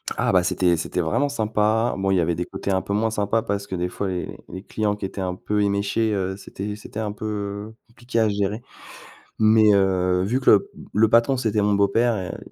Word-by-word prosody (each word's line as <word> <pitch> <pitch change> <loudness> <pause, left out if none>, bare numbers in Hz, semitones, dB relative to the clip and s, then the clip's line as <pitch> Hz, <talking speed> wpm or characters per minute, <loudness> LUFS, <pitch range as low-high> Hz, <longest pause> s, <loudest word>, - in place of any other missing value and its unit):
Ah - - +1
bah, 90 - +4
c'était 90 -1 +2
c'était 85 +2 -2
vraiment 80 - +1
sympa. 110 -2 +1
Bon, 95 0 0
il - - +3
y 90 - +3
avait 85 0 0
des 90 +2 -3
côtés 100 - -4
un 95 -1 +1
peu 100 - -4
moins 110 +2 +1
sympa, 105 +1 0
parce 100 -2 -3
que 95 - -4
des 90 0 -2
fois, 100 +2 -4
les 90 -2 -4
les 95 - -8
clients 105 -1 -1
qui 105 - -5
étaient 95 - -7
un 90 -1 -2
peu 105 +3 -1
éméchés, 100 +2 0
heu, 95 -1 -2
c'était 100 +1 -6
c'était 105 0 -8
un 105 -1 -2
peu 105 0 -5
compliqué 115 0 -4
à 110 -1 +3
gérer. 100 +2 -1 0.8
Mais, 110 -1 +5
heu, 90 -2 +2
vu 120 +7 0
que - - +4
le 100 - +4 0.2
le 110 +1 +4
patron, 115 +4 +4
c'était 110 -3 0
mon 105 0 +2
beau-père, 100 +4 +2
heu, 95 -3 -5
105 Hz, 225 wpm, -23 LUFS, 95-110 Hz, 0.8 s, Mais